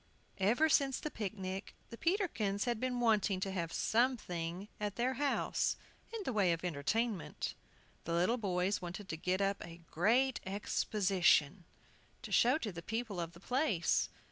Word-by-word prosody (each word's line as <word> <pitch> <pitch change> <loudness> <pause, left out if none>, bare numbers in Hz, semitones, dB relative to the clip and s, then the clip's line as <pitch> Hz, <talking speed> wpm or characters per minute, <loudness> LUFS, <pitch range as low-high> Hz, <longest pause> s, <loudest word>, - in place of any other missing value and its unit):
EVER 235 +11 +4
since 275 -3 +3
the 305 - -4
picnic 195 -2 -5 0.2
the - - -6
Peterkins 255 - 0
had 240 -3 0
been 250 0 -1
wanting 215 -5 +2
to 195 - -1
have 170 -3 -2
"something" 195 -8 0
at 210 -1 -2
their 250 +2 +1
house 285 +2 0 0.4
in 455 -2 -4
the 260 - -1
way 200 -5 +3
of 170 +1 -2
entertainment. 180 +6 -1 0.5
The 170 - -2
little 180 +8 +2
boys 190 -1 0
wanted 180 +3 -6
to - - -2
get 180 +4 -1
up 195 0 0
a 170 0 -10
"great 245 +9 +3
Exposition," 190 -4 +2 0.6
to - - -7
show 250 +5 +5
to 225 -10 -4
the 170 -2 -7
people 225 0 -3
of 170 0 -4
the 170 - -13
place. 245 - +1
200 Hz, 160 wpm, -34 LUFS, 180-240 Hz, 0.6 s, show